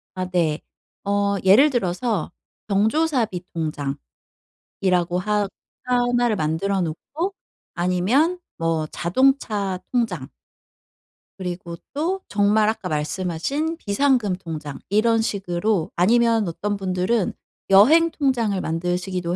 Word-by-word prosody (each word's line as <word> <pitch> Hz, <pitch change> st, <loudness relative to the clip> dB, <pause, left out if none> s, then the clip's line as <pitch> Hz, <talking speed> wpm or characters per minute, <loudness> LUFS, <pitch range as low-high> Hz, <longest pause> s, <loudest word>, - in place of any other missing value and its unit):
아 185 Hz, 0 st, -2 dB
네. 165 Hz, -4 st, +1 dB, 0.4 s
어 200 Hz, 0 st, +1 dB
예를 225 Hz, +11 st, +6 dB
들어서 210 Hz, -3 st, -1 dB, 0.4 s
경조사비 220 Hz, -, +1 dB
통장이라고 145 Hz, -4 st, -4 dB, 1.0 s
하 210 Hz, +1 st, 0 dB, 0.4 s
하나를 245 Hz, -2 st, +2 dB
만들어 175 Hz, +5 st, 0 dB
놓고 300 Hz, -, -3 dB, 0.4 s
아니면 200 Hz, -, +1 dB, 0.2 s
뭐 165 Hz, -2 st, 0 dB
자동차 205 Hz, -, +1 dB
통장 195 Hz, -, -1 dB, 1.1 s
그리고 175 Hz, -2 st, -5 dB, 0.2 s
또 355 Hz, +6 st, -1 dB
정말 210 Hz, +1 st, +3 dB
아까 220 Hz, -4 st, -3 dB
말씀하신 185 Hz, -, -2 dB
비상금 225 Hz, -, +1 dB
통장 155 Hz, -6 st, -7 dB
이런 225 Hz, +3 st, +3 dB
식으로 195 Hz, -3 st, -1 dB
아니면 225 Hz, +2 st, +3 dB
어떤 205 Hz, +5 st, -2 dB
분들은 185 Hz, +2 st, 0 dB, 0.4 s
여행 315 Hz, +12 st, +6 dB
통장을 235 Hz, -9 st, 0 dB
만드시기도 175 Hz, +1 st, -2 dB
200 Hz, 235 characters per minute, -22 LUFS, 175-240 Hz, 1.1 s, 예를